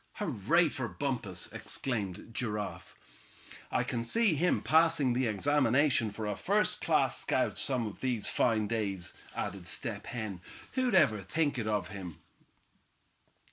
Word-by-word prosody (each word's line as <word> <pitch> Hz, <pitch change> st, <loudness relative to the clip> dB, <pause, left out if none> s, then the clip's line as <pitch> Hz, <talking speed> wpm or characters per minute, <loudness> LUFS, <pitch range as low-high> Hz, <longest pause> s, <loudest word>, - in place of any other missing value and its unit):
"Hurray 165 Hz, -, +2 dB
for 130 Hz, -3 st, -3 dB
Bumpus!" 115 Hz, -10 st, -3 dB
exclaimed 110 Hz, -5 st, -4 dB
Giraffe. 105 Hz, -4 st, -4 dB, 0.8 s
"I -, -, +2 dB
can 115 Hz, -1 st, -2 dB
see 215 Hz, -, +3 dB
him 175 Hz, +4 st, +1 dB
passing 160 Hz, -5 st, +4 dB
the 125 Hz, 0 st, +1 dB
examination 130 Hz, +2 st, +2 dB
for 105 Hz, +1 st, -5 dB
a 105 Hz, -1 st, -1 dB
first -, -, +1 dB
class -, -, +2 dB
scout -, -, 0 dB
some 125 Hz, -4 st, +1 dB
of 105 Hz, -, -7 dB
these 125 Hz, -5 st, -1 dB
fine 110 Hz, -3 st, +2 dB
days," 100 Hz, -5 st, -2 dB, 0.2 s
added 95 Hz, -3 st, -4 dB
Step -, -, -4 dB
Hen. 110 Hz, -7 st, -5 dB, 0.3 s
"Who'd 255 Hz, -5 st, +1 dB
ever 110 Hz, -, +4 dB
think 145 Hz, -, 0 dB
it 110 Hz, -, -2 dB
of 105 Hz, -4 st, 0 dB
him?" 90 Hz, -6 st, -7 dB
115 Hz, 140 wpm, -31 LUFS, 105-145 Hz, 0.8 s, passing